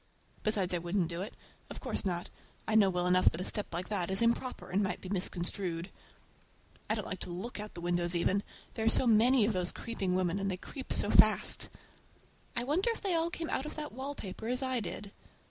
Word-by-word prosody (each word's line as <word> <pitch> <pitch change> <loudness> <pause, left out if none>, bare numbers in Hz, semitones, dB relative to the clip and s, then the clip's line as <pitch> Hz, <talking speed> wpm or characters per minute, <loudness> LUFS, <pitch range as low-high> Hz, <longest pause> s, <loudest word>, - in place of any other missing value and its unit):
Besides 200 -4 +1
I 175 - +1
wouldn't 175 0 0
do 170 +1 -3
it. 200 - -6 0.3
Of - - -7
course - - -2
not. 175 -2 -2 0.4
I 220 - 0
know 210 -3 +6
well 180 -1 0
enough 180 0 +5
that 165 - -6
a 185 - -3
step 210 - -1
like 175 +2 -3
that 190 -4 0
is 190 +4 +3
improper 235 +2 0
and 195 +3 +2
might 195 - -1
be 185 - -8
misconstrued. 180 -1 -2 1.0
I 215 - +3
don't 215 - -4
like 185 - -4
to - - -6
look 190 +7 -5
out 210 0 -5
of - - -26
the 170 - -6
windows 175 0 +2
even—there 200 +5 -2
are - - +6
so 260 - +5
many 235 +1 +5
of 215 - +1
those 180 -1 0
creeping 195 -6 -2
women, 185 +1 +1
and 195 0 -1
they 185 - -2
creep 265 +7 -8
so - - +3
fast. - - +5 0.9
I 235 - 0
wonder 325 - +1
if 460 - -2
they 390 -3 0
all 330 0 +1
come 335 -1 -4
out 270 - -1
of - - -7
that 300 -1 -5
wallpaper 260 -5 -5
as 250 +2 -1
I 260 -1 0
did? 205 -1 -4
200 Hz, 225 wpm, -32 LUFS, 180-235 Hz, 1.0 s, know